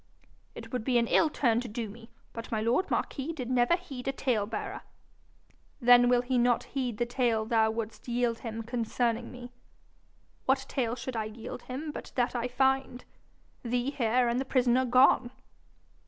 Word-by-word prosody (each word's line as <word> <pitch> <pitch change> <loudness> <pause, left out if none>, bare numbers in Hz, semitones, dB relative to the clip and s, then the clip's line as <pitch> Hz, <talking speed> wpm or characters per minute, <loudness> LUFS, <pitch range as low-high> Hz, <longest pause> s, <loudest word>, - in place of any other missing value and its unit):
'It - - -10
would 250 - -2
be 250 0 +2
an 235 - +3
ill 310 +7 +3
turn 235 -6 +2
to 250 - -6
do 230 +1 -4
me, 225 +3 -12 0.2
but 230 -1 -7
my 220 - 0
lord 235 - +1
marquis 280 +3 -2
did 255 -5 -5
never 250 +6 +4
heed 270 -8 -8
a - - +2
tale 245 -6 0
bearer.' 220 -1 -5 1.0
'Then 245 -1 +6
will 245 0 +3
he 250 0 +1
not 240 0 +3
heed 250 -5 -3
the 240 - +1
tale 235 -3 0
thou 220 -1 +3
wouldst 220 0 -5
yield 240 -1 0
him 225 -1 -5
concerning 235 0 -1
me.' 245 0 -10 1.0
'What 265 0 +2
tale 240 -3 -1
should 255 0 -6
I 220 -1 -1
yield 215 +1 -8
him 295 +5 -4
but - - -9
that 245 -1 +1
I 240 0 -1
find 265 0 0 0.6
thee 245 +2 -1
here 245 -2 +2
and 235 +1 +1
the - - 0
prisoner 255 -1 +2
gone?' 255 0 +5
245 Hz, 180 wpm, -29 LUFS, 230-255 Hz, 1.0 s, Then